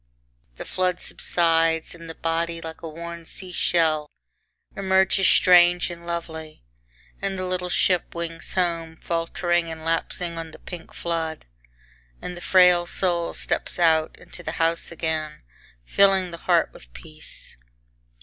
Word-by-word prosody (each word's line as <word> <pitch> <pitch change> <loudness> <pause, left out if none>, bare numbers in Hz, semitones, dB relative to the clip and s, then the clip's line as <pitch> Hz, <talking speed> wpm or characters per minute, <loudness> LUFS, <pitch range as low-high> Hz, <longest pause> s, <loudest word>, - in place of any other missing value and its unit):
X - - -35
The - - -7
flood 185 -1 0
subsides, 165 -1 +1
and 165 -1 -11
the 165 - -7
body, 165 0 -1
like 160 -1 -8
a 165 - -6
worn 170 +1 -7
sea 185 -2 -9
shell 160 -4 +2 0.7
emerges 190 0 +3
strange 175 0 +5
and 170 0 -10
lovely. 160 - -6 0.6
And 195 -1 -2
the 185 - -3
little 180 0 -2
ship 180 -1 +1
wings 165 0 -5
home, 165 -3 -1
faltering 170 +1 -1
and 160 0 -8
lapsing 165 +1 -2
on 165 0 -6
the 155 - -13
pink 175 -3 -10
flood, 165 -2 -3 0.7
and 180 - -6
the 175 - -10
frail 180 -2 +5
soul 175 -3 +1
steps - - -1
out, 160 -2 +3
into - - -10
the - - -5
house 165 +1 0
again 160 -2 -3 0.4
filling 190 - +4
the 170 - -7
heart - - +4
with - - -16
peace. - - -11
170 Hz, 145 wpm, -24 LUFS, 165-180 Hz, 0.7 s, strange